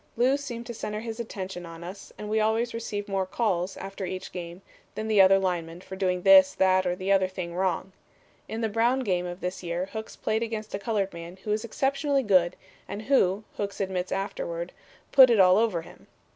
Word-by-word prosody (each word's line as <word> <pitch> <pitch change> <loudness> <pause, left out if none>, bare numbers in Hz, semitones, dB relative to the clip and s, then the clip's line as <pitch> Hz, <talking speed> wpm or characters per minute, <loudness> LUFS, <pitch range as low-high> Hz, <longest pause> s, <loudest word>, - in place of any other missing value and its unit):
'Lew' 255 +3 +4
seemed 245 -5 -6
to 240 - -6
center 215 -1 -4
his 225 0 -6
attention 190 -5 -5
on 165 0 -9
us 185 +3 -9
as 210 - -7
we 215 +1 0
always 220 +2 +1
received 210 -3 -4
more 195 -2 -1
'calls' 185 -4 -1
after 195 0 -7
each 185 0 -5
game 175 +1 -7 0.3
than 215 0 -3
the 215 -2 +5
other 190 0 +7
linemen 175 -3 -2
for 190 +1 -9
doing 180 -2 0
this, 190 -1 +7
that, 185 -1 +3
or 180 - 0
the 185 +1 -2
other 190 -1 +4
thing 180 -2 -6
wrong. 185 +1 -1 0.6
In 225 +1 -4
the 225 - +1
Brown 235 +5 +2
game 180 -6 0
of 175 +1 -7
this 180 +2 -4
year 175 +2 -3
Hooks 220 0 -6
played 220 +1 -1
against 220 -2 -4
a 195 - -2
colored 200 -2 -1
man 170 +2 -9
who 210 - -3
was 215 +1 0
exceptionally 275 +4 0
good 185 -5 +3 0.3
and 210 - -6
who, 215 -6 +2
Hooks 200 -1 -4
admitted 185 -2 -2
afterward, - - -3 0.4
'put 260 -2 +9
it 230 -3 +4
all 185 +1 +6
over' 205 -8 +1
him. - - -16
195 Hz, 210 wpm, -27 LUFS, 185-225 Hz, 0.6 s, put